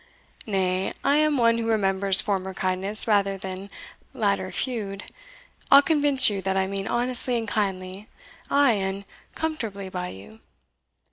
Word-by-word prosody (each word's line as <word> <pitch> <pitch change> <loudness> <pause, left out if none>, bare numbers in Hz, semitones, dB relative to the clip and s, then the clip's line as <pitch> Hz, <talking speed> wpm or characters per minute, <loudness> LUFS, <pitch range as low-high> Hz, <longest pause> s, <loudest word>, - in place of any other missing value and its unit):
nay, 190 -2 -1
I 285 - +2
am 305 -1 +1
one 230 -1 +2
who 225 - -3
remembers 195 -3 +4
former 190 -2 -3
kindness 190 +3 +1
rather 200 -2 +1
than 190 +1 -7 0.5
latter 200 -3 -1
feud. 205 -6 -3 0.7
I'll 280 +1 +7
convince 290 -4 +5
you 200 -2 -1
that 190 +1 -2
I 190 - +1
meant 195 0 -5
honestly 245 0 0
and 225 -1 -5
kindly, 195 -1 -4 0.4
ay, 280 -2 +3
and 195 -1 -3 0.3
comfortably 225 -12 -5
by 180 -1 -5
you." 105 - -13
200 Hz, 140 wpm, -24 LUFS, 190-230 Hz, 0.7 s, I'll